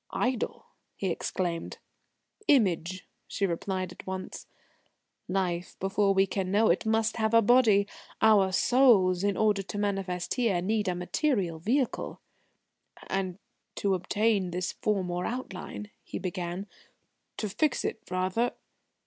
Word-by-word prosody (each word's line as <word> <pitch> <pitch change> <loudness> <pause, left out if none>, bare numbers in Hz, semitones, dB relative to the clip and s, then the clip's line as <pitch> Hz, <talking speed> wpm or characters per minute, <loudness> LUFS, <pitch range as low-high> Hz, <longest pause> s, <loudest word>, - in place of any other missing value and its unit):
"Idol!" 245 -1 -1 0.3
he 190 -3 -1
exclaimed. 170 -1 -3 0.7
"Image," 185 - +2 0.2
she 200 - -1
replied 185 +1 -2
at - - -12
once. 190 0 -6 0.8
"Life, 180 -2 -2
before 195 +1 +2
we 195 0 +5
can 190 -1 -2
know 210 +3 +3
it, 185 - 0
must 220 +1 +1
have 220 0 +1
a 230 - +8
body. 215 -3 +5 0.3
Our 205 -4 +5
souls, 195 -6 +4
in 200 -1 +1
order 210 -2 +3
to 195 +2 -7
manifest 195 -3 -1
here, 230 -8 +1
need 210 +3 0
a 180 - 0
material 180 - 0
vehicle." 245 - -1 0.9
"And 190 -2 -1 0.4
to 200 -1 +1
obtain 200 +1 +1
this 180 +1 -2
form 195 -4 -1
or 175 +1 -2
outline?" 210 -3 -6
he - - -6
began; 180 +1 -4 0.7
"to 215 - -2
fix 290 +9 0
it, - - -2
rather?" 185 +6 0
195 Hz, 130 wpm, -29 LUFS, 185-220 Hz, 0.9 s, a